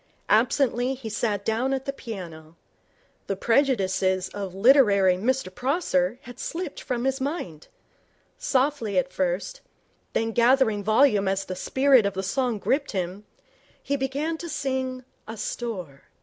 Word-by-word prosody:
Absently, 255 -1 +2
he 250 -4 -7
sat 205 -1 -2
down 240 +5 0
at 270 0 -3
the 275 - -2
piano. 170 - -9 0.7
The 195 - -1
prejudices 190 -6 +1
of 195 -2 -6
literary 200 -5 +5
Mr 230 0 -1
Prosser 245 - 0
had 245 0 -11
slipped 335 -3 -5
from 245 -2 -3
his 270 0 0
mind. 265 - -4 0.7
Softly 260 -5 0
at 270 0 0
first, 185 - -2 0.5
then 225 0 0
gathering 235 -3 +3
volume 215 -2 +4
as 195 0 0
the 185 - -5
spirit 260 +3 +3
of 200 - -4
the 190 - -2
song 245 +3 0
gripped 280 +7 -1
him, 190 +2 -3 0.6
he 280 - -1
began 285 +4 -2
to 340 - -6
sing 260 -3 -2 0.2
'Asthore'. 210 - -5
235 Hz, 135 wpm, -25 LUFS, 195-270 Hz, 0.7 s, literary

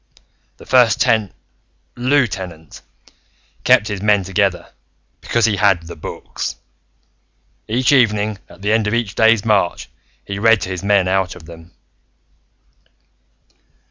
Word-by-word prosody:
"The - - -15
First 125 -4 +3
Ten 110 -3 +1 0.6
Lieutenant 100 - -2 0.8
kept 105 - +4
his 105 -2 -5
men 105 -1 +2
together, 95 -1 -1 0.5
because 120 -2 0
he 105 -3 0
had 95 -5 +2
The 85 - -9
Books. - - -6 1.1
Each 125 +5 +1
evening, 105 -6 +2
at - - -16
the 105 - 0
end 110 -1 +1
of 105 - 0
each 115 -4 -2
day's 110 -1 +3
march, 100 -5 0 0.4
he 100 0 -5
read 115 0 +4
to - - -4
his 95 -1 -5
men 100 -2 +2
out 95 -1 0
of 80 - -14
them." 80 0 -13
105 Hz, 130 wpm, -18 LUFS, 95-115 Hz, 1.1 s, kept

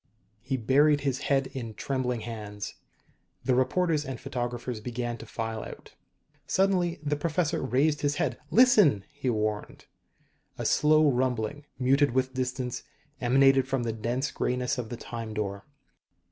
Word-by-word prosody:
He 130 +3 -2
buried 145 +5 +4
his 135 -2 -1
head 135 -1 +3
in 115 -5 -6
trembling 125 -3 -2
hands. 105 -2 -6 0.7
The 130 - +3
reporters 155 +4 +2
and 135 -4 -6
photographers 120 -1 -4
began 120 +1 -3
to 115 - -10
file 115 0 -4
out. - - -10 0.5
Suddenly 185 -3 +2
the 145 0 0
professor 160 +2 0
raised 140 +4 +1
his 145 0 +1
head. - - -1
"Listen!" 210 - +5
he 145 -3 -3
warned. 105 -2 -2 0.7
A - - -4
slow 155 0 +4
rumbling, 130 +1 0
muted 135 +1 +3
with 130 0 +1
distance, 125 -1 -2 0.4
emanated 135 +1 +4
from 135 -2 -1
the 115 -1 -1
dense 120 +5 -2
grayness 125 0 -1
of 115 -3 -4
the 120 - -5
Time 115 -2 -6
Door. 100 -2 -3
130 Hz, 145 wpm, -28 LUFS, 120-145 Hz, 0.7 s, Listen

